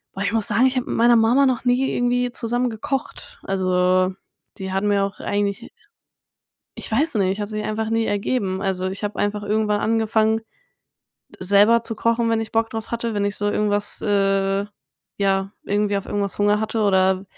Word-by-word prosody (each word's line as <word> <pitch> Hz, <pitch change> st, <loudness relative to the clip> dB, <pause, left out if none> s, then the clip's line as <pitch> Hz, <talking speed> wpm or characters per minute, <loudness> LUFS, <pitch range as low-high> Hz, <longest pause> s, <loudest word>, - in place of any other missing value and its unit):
boah, 195 Hz, -, -5 dB
ich 200 Hz, -, 0 dB
muss 225 Hz, -2 st, 0 dB
sagen, 235 Hz, +4 st, +3 dB
ich 260 Hz, -, -2 dB
habe 255 Hz, -, -1 dB
mit -, -, -4 dB
meiner 235 Hz, +1 st, +5 dB
Mama 240 Hz, +5 st, +4 dB
noch 250 Hz, -1 st, -1 dB
nie 250 Hz, +2 st, +2 dB
irgendwie 245 Hz, 0 st, 0 dB
zusammen 245 Hz, 0 st, -1 dB
gekocht. 265 Hz, +4 st, -5 dB
Also, 185 Hz, -1 st, +1 dB, 0.5 s
die 190 Hz, 0 st, -5 dB
hatte 195 Hz, +2 st, -1 dB
mir 200 Hz, -1 st, +2 dB
auch 200 Hz, -, -8 dB
eigentlich 205 Hz, +3 st, -2 dB, 1.1 s
ich -, -, -8 dB
weiß 275 Hz, +3 st, +1 dB
nicht, 195 Hz, 0 st, +1 dB
hat 205 Hz, -, -3 dB
sich 215 Hz, 0 st, -4 dB
einfach 220 Hz, +1 st, -2 dB
nie 225 Hz, 0 st, +1 dB
ergeben. 200 Hz, -2 st, -1 dB
Also, 190 Hz, -2 st, -1 dB
ich 195 Hz, +2 st, -6 dB
habe 205 Hz, -, -3 dB
einfach 205 Hz, 0 st, -1 dB
irgendwann 210 Hz, 0 st, 0 dB
angefangen, 220 Hz, 0 st, +1 dB, 1.0 s
selber 205 Hz, +5 st, +4 dB
zu 225 Hz, -2 st, -2 dB
kochen, 230 Hz, 0 st, +1 dB
wenn 225 Hz, 0 st, +1 dB
ich 220 Hz, -, -6 dB
Bock 225 Hz, 0 st, +1 dB
drauf 225 Hz, 0 st, -6 dB
hatte, 235 Hz, -1 st, -2 dB
wenn 200 Hz, 0 st, 0 dB
ich 205 Hz, 0 st, -1 dB
so 205 Hz, 0 st, +1 dB
irgendwas 205 Hz, -1 st, 0 dB
äh, 195 Hz, -1 st, +1 dB, 0.5 s
ja, 195 Hz, 0 st, 0 dB
irgendwie 205 Hz, 0 st, 0 dB
auf 195 Hz, -, -4 dB
irgendwas 200 Hz, -1 st, -2 dB
Hunger 205 Hz, +1 st, +2 dB
hatte 220 Hz, 0 st, -1 dB
oder 190 Hz, -1 st, +2 dB
210 Hz, 185 wpm, -22 LUFS, 200-225 Hz, 1.1 s, meiner